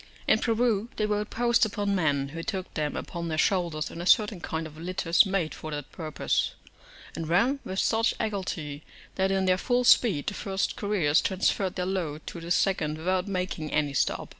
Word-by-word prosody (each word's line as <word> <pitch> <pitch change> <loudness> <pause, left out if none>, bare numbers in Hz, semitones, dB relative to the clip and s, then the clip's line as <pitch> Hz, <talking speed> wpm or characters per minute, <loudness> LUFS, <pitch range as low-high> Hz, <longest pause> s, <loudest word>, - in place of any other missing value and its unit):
In - - +5
Peru 230 -2 +1
they 215 - 0
rode 210 0 -1
post 235 0 +2
upon 205 -2 0
men, 145 -7 +1
who 165 +3 -6
took 185 +2 -4
them 150 -2 -2
upon 170 -2 -5
their 160 -1 -2
shoulders 170 -3 0
in 165 - -7
a 175 - -4
certain 210 -2 +4
kind 160 0 -3
of 155 -1 -10
litters 175 +2 +2
made 190 -5 -1
for 155 - -7
that 145 -2 -6
purpose, 155 -3 -1 0.6
and 165 -1 -4
ran 235 +11 +3
with 190 - -5
such 225 +3 +2
agility 175 -8 -3 0.3
that, 190 0 +1
in 190 0 +1
their 185 0 +3
full 245 +3 +1
speed, 210 - +4
the - - -2
first 195 -1 -2
couriers 180 -8 +2
transferred 190 0 0
their 180 - -1
load 170 -5 -3
to 170 - -7
the 170 - -7
second 175 -4 +1
without 185 +3 0
making 180 -5 -3
any 145 -2 0
stop. 140 - 0
185 Hz, 190 wpm, -27 LUFS, 160-205 Hz, 0.6 s, In